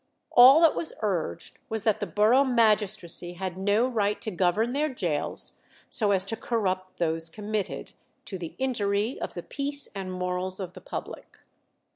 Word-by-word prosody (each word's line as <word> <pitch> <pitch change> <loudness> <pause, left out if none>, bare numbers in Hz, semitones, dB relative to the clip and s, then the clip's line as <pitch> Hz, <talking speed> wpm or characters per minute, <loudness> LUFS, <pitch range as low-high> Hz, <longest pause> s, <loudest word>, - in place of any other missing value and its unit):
All 260 +6 +8
that 330 -2 +6
was 330 - -4
urged 170 -4 -3
was 220 -2 -3
that 220 -1 +2
the - - -3
borough 225 +6 +4
magistracy 210 -8 +2
had 185 0 -5
no 205 +5 +2
right 210 -4 0
to 220 - -2
govern 195 +6 +1
their 300 +2 0
gaols 170 - 0 0.3
so 210 -3 0
as 195 -1 +2
to 225 - -2
corrupt 190 -5 -2
those 165 -1 0
committed, 210 +2 -4 0.3
"to 190 - -6
the 170 -2 -7
injury 220 -3 -1
of - - -5
the - - -5
peace 285 0 -2
and 190 -2 -5
morals 180 +1 -3
of 185 -2 -6
the - - -12
public." - - -8
205 Hz, 165 wpm, -27 LUFS, 185-230 Hz, 0.3 s, All